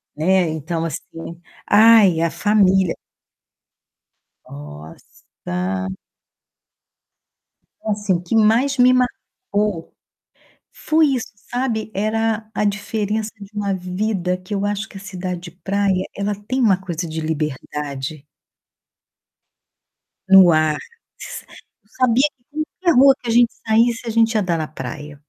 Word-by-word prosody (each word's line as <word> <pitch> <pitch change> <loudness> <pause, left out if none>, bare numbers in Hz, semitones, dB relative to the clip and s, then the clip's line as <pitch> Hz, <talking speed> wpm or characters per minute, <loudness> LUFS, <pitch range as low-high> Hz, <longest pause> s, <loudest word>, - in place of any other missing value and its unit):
Né, 180 +2 +2
então, 160 +2 -3
assim: 165 +2 -7 0.3
"Ai, 215 -5 +6
a 165 0 +1
família." 190 -3 +2 1.6
Nossa 90 +5 -6 1.9
Então, 215 - -3
assim, 205 -2 0
o 175 - -1
que 180 +6 -3
mais 235 +6 +3
me 250 +1 +6
marcou 210 -7 -2 0.8
foi 315 0 +2
isso, 260 -4 -2 0.2
sabe. 235 -3 -2
Era 220 +1 -1
a - - -1
diferença 210 +1 -2
de 200 +1 -11
uma 200 -1 -1
vida, 185 0 -2
que 185 +3 -8
eu 200 0 -1
acho 205 +1 -2
que - - -11
a - - -8
cidade 185 -2 -5
de 175 -2 -10
praia, 190 +1 -1
ela 200 +1 -2
tem 215 +6 -4
uma 200 -6 +4
coisa 175 -3 -4
de 160 0 -4
liberdade 150 -1 -4 2.0
no 190 -3 +8
ar. 155 -1 +2 0.4
S - - -8 0.4
eu 210 - -34 0.2
sabia 255 +5 +3
que 295 +5 -5 0.2
qualquer 335 -8 +4
rua 270 0 +7
que 240 - -5
a - - +1
gente 240 0 +4
saísse, 230 +1 +2
a - - -1
gente 225 0 +2
ia 210 - +2
dar 170 -2 0
na 155 -1 -3
praia 145 +1 -8
195 Hz, 130 wpm, -20 LUFS, 165-220 Hz, 2.0 s, no